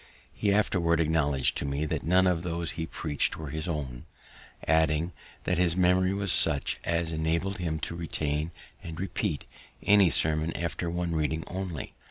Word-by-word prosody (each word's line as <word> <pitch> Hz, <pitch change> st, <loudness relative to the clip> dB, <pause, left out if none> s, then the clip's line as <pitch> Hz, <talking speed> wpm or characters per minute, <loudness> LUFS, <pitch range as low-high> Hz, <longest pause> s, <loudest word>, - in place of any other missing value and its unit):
He 100 Hz, -, +1 dB
afterward 90 Hz, -5 st, +2 dB
acknowledg'd 75 Hz, -4 st, +2 dB
to -, -, 0 dB
me 70 Hz, +2 st, -1 dB
that 75 Hz, -, -2 dB
none 90 Hz, +3 st, +4 dB
of 90 Hz, -3 st, +2 dB
those 85 Hz, -1 st, -2 dB
he 80 Hz, -1 st, -4 dB
preach'd 75 Hz, -4 st, -1 dB
were 80 Hz, -4 st, -6 dB
his 80 Hz, +3 st, -3 dB
own; 70 Hz, -7 st, -4 dB, 0.6 s
adding, 80 Hz, +1 st, +3 dB, 0.3 s
that 90 Hz, -2 st, 0 dB
his 85 Hz, -2 st, +3 dB
memory 90 Hz, +1 st, +3 dB
was 100 Hz, -1 st, -1 dB
such 75 Hz, -4 st, +1 dB
as 85 Hz, -1 st, 0 dB
enabled 85 Hz, +5 st, -1 dB
him 80 Hz, -3 st, -1 dB
to 85 Hz, -, -3 dB
retain 75 Hz, -2 st, -2 dB, 0.3 s
and 80 Hz, -1 st, -7 dB
repeat 95 Hz, -3 st, -2 dB, 0.4 s
any 100 Hz, -3 st, +6 dB
sermon 80 Hz, +2 st, +1 dB
after 85 Hz, 0 st, -2 dB
one 85 Hz, 0 st, -2 dB
reading 80 Hz, +1 st, 0 dB
only. 90 Hz, -6 st, -5 dB
85 Hz, 165 wpm, -28 LUFS, 80-90 Hz, 0.6 s, any